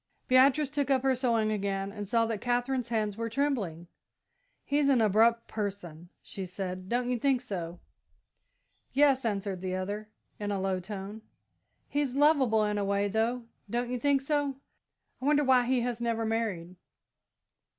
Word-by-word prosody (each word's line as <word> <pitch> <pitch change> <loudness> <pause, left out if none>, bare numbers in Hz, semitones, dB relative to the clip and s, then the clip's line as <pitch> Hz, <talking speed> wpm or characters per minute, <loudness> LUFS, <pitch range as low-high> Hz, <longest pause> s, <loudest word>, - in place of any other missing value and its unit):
Beatrice 270 +3 +4
took 285 -2 -1
up 265 -2 +2
her 265 -1 +3
sewing 230 -4 +1
again 195 -1 -2
and 205 -1 -6
saw 230 +2 +2
that 225 -2 -3
Katherine's 245 0 -1
hands 215 -3 -1
were 230 0 -2
trembling. 225 - -1 0.8
"He's 285 0 +2
an 265 -3 +4
abrupt 225 +2 +3
person," 185 -6 -5
she 190 -2 -7
said; 185 0 -5
"don't 245 +1 0
you 250 -1 0
think 270 0 +2
so?" 180 -8 -6 1.1
"Yes," 275 -1 +4
answered 200 -3 -2
the 185 -1 -2
other, 205 +3 -4 0.3
in 205 -1 -3
a 200 -1 -1
low 190 -1 -1
tone. 200 +3 -7 0.7
"He's 285 -3 -1
lovable 275 -7 +4
in 210 0 -1
a - - 0
way, 200 +1 0
though, 230 +4 0 0.3
don't 240 +2 -2
you 250 - -2
think 280 +1 +2
so? 285 -1 0 0.7
I - - -4
wonder 295 0 +4
why 255 -2 +4
he 255 -1 +2
has 240 -1 -3
never 230 -1 -1
married?" 210 -6 -2
230 Hz, 160 wpm, -29 LUFS, 200-260 Hz, 1.1 s, Beatrice